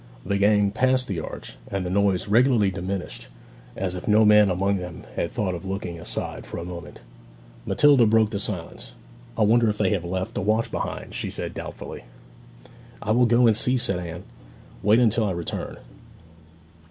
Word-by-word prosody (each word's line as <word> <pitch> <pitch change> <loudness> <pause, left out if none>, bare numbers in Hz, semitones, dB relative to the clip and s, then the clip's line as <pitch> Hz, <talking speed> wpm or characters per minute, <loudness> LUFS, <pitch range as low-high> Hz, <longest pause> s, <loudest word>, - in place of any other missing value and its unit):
The 100 0 0
gang 105 0 +3
passed 130 +3 +2
the 95 -5 -3
arch, 80 - -8
and 95 -2 -3
the 90 - -3
noise 100 -1 +1
regularly 115 -2 +4
diminished, 95 0 -5 0.5
as 95 -2 -2
if 90 - -7
no 110 +1 +5
man 105 -1 +6
among 100 +2 +1
them 90 -2 -7
had 85 - -2
thought 105 -6 -1
of 85 - -6
looking 95 -3 -4
aside - - -4
for - - -6
a 85 - -5
moment. 85 -4 -9 0.7
Matilda 140 -5 +5
broke 110 -1 +3
the 100 - -2
silence. 95 -5 -4 0.4
'I 110 - +3
wonder 115 +2 +4
if 105 - -2
they 100 -3 +1
have 100 -4 0
left 95 +3 -3
a - - -2
watch 110 +4 +1
behind?' - - -4
she - - -3
said - - -5
doubtfully. - - -8 1.0
'I 110 - -1
will 120 +2 +4
go 120 +1 +4
and 110 -2 +5
see,' 125 +4 +1
said 115 -7 +1
Anne. 85 0 -7 0.6
'Wait 110 +2 +4
till 115 +1 +1
I 105 - 0
return.' 85 -1 -5
100 Hz, 180 wpm, -24 LUFS, 90-110 Hz, 1.0 s, man